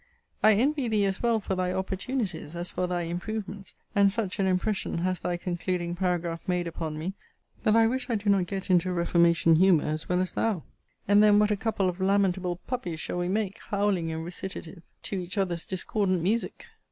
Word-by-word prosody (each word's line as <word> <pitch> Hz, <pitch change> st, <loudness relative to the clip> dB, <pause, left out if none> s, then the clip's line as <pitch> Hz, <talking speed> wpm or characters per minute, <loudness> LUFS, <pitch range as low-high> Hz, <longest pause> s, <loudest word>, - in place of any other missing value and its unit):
I 215 Hz, 0 st, +7 dB
envy 270 Hz, +5 st, +1 dB
thee 215 Hz, -3 st, +2 dB
as 195 Hz, 0 st, -1 dB
well 235 Hz, -2 st, +2 dB
for 195 Hz, -, -3 dB
thy 185 Hz, -1 st, 0 dB
opportunities, 190 Hz, -, -3 dB
as 175 Hz, +1 st, -4 dB
for 180 Hz, -, -1 dB
thy 175 Hz, -1 st, -1 dB
improvements: 195 Hz, +3 st, -5 dB, 0.2 s
and 200 Hz, -1 st, +4 dB
such 205 Hz, -1 st, -3 dB
an 195 Hz, -, +2 dB
impression 190 Hz, +1 st, 0 dB
has 185 Hz, +1 st, -1 dB
thy 175 Hz, -, -2 dB
concluding 175 Hz, 0 st, -2 dB
paragraph* 175 Hz, -2 st, -1 dB
made 180 Hz, -1 st, 0 dB
upon 160 Hz, -2 st, -4 dB
me, 170 Hz, +5 st, -3 dB, 0.5 s
that 215 Hz, -, +3 dB
I 225 Hz, 0 st, +6 dB
wish 255 Hz, +3 st, -1 dB
I 235 Hz, -, +1 dB
do 205 Hz, 0 st, -4 dB
not 195 Hz, -3 st, +3 dB
get 190 Hz, +1 st, -3 dB
into 180 Hz, 0 st, +3 dB
a -, -, -1 dB
reformation 170 Hz, -1 st, +4 dB
humour 180 Hz, -3 st, +5 dB
as 155 Hz, +1 st, -3 dB
well 180 Hz, 0 st, +2 dB
as 185 Hz, -, -1 dB
thou: 210 Hz, -8 st, -1 dB, 0.4 s
and 205 Hz, +1 st, +6 dB
then 210 Hz, -1 st, +6 dB
what 210 Hz, 0 st, +4 dB
a -, -, +3 dB
couple 200 Hz, -2 st, 0 dB
of 180 Hz, 0 st, -3 dB
lamentable 190 Hz, -2 st, +1 dB
puppies 180 Hz, -11 st, -3 dB
shall 175 Hz, -, -3 dB
we 175 Hz, -, -1 dB
make, 205 Hz, +2 st, -1 dB
howling 200 Hz, -5 st, 0 dB
in 160 Hz, 0 st, -4 dB
recitative 175 Hz, 0 st, -7 dB, 0.2 s
to 195 Hz, -, -3 dB
each 180 Hz, +3 st, -5 dB
other's 175 Hz, -4 st, -1 dB
discordant 185 Hz, -1 st, 0 dB
music! 220 Hz, +6 st, -1 dB
185 Hz, 200 wpm, -27 LUFS, 175-205 Hz, 0.5 s, I